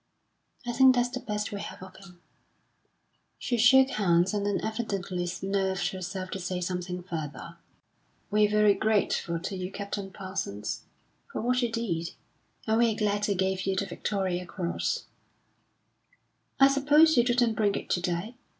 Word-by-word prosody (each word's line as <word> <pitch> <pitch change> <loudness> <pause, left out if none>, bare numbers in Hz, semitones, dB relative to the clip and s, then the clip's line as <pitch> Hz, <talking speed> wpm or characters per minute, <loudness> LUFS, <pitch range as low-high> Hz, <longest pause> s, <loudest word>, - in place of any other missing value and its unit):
"I 240 - -1
think 260 +1 +6
that's 245 0 +2
the 255 0 -4
best 210 -4 -3
we 200 -1 -4
have - - -8
of 185 0 -12
him." 180 -3 -15 1.2
She 245 - -2
shook 260 +3 +6
hands, 180 -3 +2
and 205 -1 0
then 205 - 0
evidently 195 -5 -3
nerved 195 -1 0
herself 185 0 -5
to 195 - -4
say 180 0 -3
something 180 0 -4
further. 165 0 -6 0.7
"We're 210 0 +4
very 210 -1 +5
grateful 200 -5 0
to 190 +3 -5
you, 185 0 -5
Captain 200 -1 -5
Parsons, 185 - -5 0.5
for - - -4
what 250 +2 +1
you 240 -2 0
did. 180 -8 -3 0.5
And 220 0 +2
we're 230 -2 +3
glad 205 -1 0
they 200 - 0
gave 190 0 -1
you 195 - +1
the 200 - 0
Victoria 185 -3 -2
Cross." 175 -3 -2 1.5
"I 270 - +8
suppose 295 +3 +5
you 240 - +5
didn't 240 -1 +2
bring 210 -2 +1
it - - -4
to 175 - +1
day?" 180 +5 -2
200 Hz, 160 wpm, -28 LUFS, 185-225 Hz, 1.5 s, I